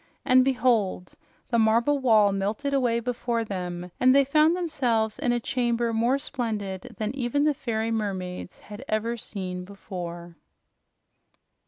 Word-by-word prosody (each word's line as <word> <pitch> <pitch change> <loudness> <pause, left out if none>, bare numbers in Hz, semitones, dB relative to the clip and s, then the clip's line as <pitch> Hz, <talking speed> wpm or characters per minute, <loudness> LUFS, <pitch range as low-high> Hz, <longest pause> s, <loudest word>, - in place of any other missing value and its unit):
And 255 0 +6
behold! 235 -9 +1 0.4
the 235 - +2
marble 230 +6 +3
wall 220 -6 +4
melted 210 +9 -2
away 245 -4 +2
before 235 -1 -2
them, 180 -3 -5
and 255 +1 +5
they 280 0 +5
found 305 +4 +4
themselves 245 -11 0
in 250 -5 +1
a 240 - +1
chamber 235 -1 0
more 235 +4 +2
splendid 215 -9 -4
than 215 +3 -3
even 275 +2 0
the 300 0 +3
fairy 230 -4 -2
mermaids 190 -5 -4
had 210 +4 -10
ever 220 +2 -1
seen 185 -5 -5
before. 175 -3 -8
230 Hz, 140 wpm, -26 LUFS, 200-255 Hz, 0.4 s, And